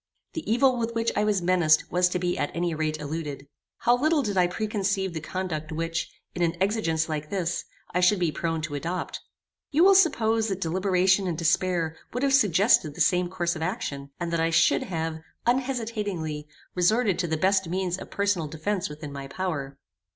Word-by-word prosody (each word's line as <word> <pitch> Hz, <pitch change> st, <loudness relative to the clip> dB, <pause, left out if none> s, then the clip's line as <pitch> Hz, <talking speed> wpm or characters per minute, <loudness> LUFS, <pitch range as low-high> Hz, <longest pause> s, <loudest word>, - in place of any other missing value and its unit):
The 315 Hz, -9 st, -4 dB
evil 255 Hz, +2 st, +4 dB
with 230 Hz, 0 st, -2 dB
which 230 Hz, 0 st, +1 dB
I 210 Hz, -, +2 dB
was 205 Hz, -4 st, +1 dB
menaced 170 Hz, -4 st, +3 dB
was 180 Hz, 0 st, +3 dB
to 180 Hz, -, -1 dB
be 180 Hz, 0 st, -1 dB
at 145 Hz, -, -1 dB
any 170 Hz, 0 st, 0 dB
rate 155 Hz, 0 st, -2 dB
eluded. 150 Hz, -2 st, -5 dB, 0.4 s
How 240 Hz, -, +4 dB
little 300 Hz, +3 st, +2 dB
did 205 Hz, -4 st, -2 dB
I 180 Hz, -1 st, +4 dB
preconceive 195 Hz, -1 st, -1 dB
the 160 Hz, -, -4 dB
conduct 160 Hz, -3 st, -4 dB
which, 165 Hz, +1 st, -2 dB, 0.2 s
in 175 Hz, -, -4 dB
an 170 Hz, 0 st, +1 dB
exigence 185 Hz, -6 st, +1 dB
like 155 Hz, -1 st, -4 dB
this, 180 Hz, -3 st, -2 dB, 0.3 s
I 180 Hz, -, +2 dB
should 180 Hz, +3 st, +4 dB
be 175 Hz, -3 st, +1 dB
prone 165 Hz, 0 st, -2 dB
to 160 Hz, -2 st, -4 dB
adopt. 170 Hz, +5 st, -3 dB, 0.5 s
You 315 Hz, +4 st, +3 dB
will 390 Hz, +1 st, +7 dB
suppose 230 Hz, -, +3 dB
that 195 Hz, -3 st, -2 dB
deliberation 190 Hz, +2 st, +2 dB
and 170 Hz, -3 st, -2 dB
despair 165 Hz, 0 st, +1 dB, 0.2 s
would 250 Hz, +3 st, -2 dB
have 275 Hz, -1 st, +2 dB
suggested 200 Hz, -, +4 dB
the -, -, -11 dB
same 175 Hz, +3 st, +3 dB
course 175 Hz, -1 st, -1 dB
of 160 Hz, -, -6 dB
action, 150 Hz, -, -3 dB
and 170 Hz, -1 st, -3 dB
that 170 Hz, -, +1 dB
I 165 Hz, 0 st, +2 dB
should 165 Hz, 0 st, +4 dB
have, 160 Hz, -2 st, -3 dB, 0.3 s
unhesitatingly, 220 Hz, -, -1 dB, 0.3 s
resorted 200 Hz, +2 st, +2 dB
to 175 Hz, -, 0 dB
the 160 Hz, -1 st, -1 dB
best 190 Hz, +1 st, +2 dB
means 185 Hz, 0 st, -1 dB
of -, -, -9 dB
personal 200 Hz, -5 st, 0 dB
defence 170 Hz, +6 st, -2 dB
within 150 Hz, -1 st, -8 dB
my 140 Hz, -1 st, -6 dB
power. 140 Hz, -4 st, -4 dB
180 Hz, 195 wpm, -26 LUFS, 160-205 Hz, 0.5 s, will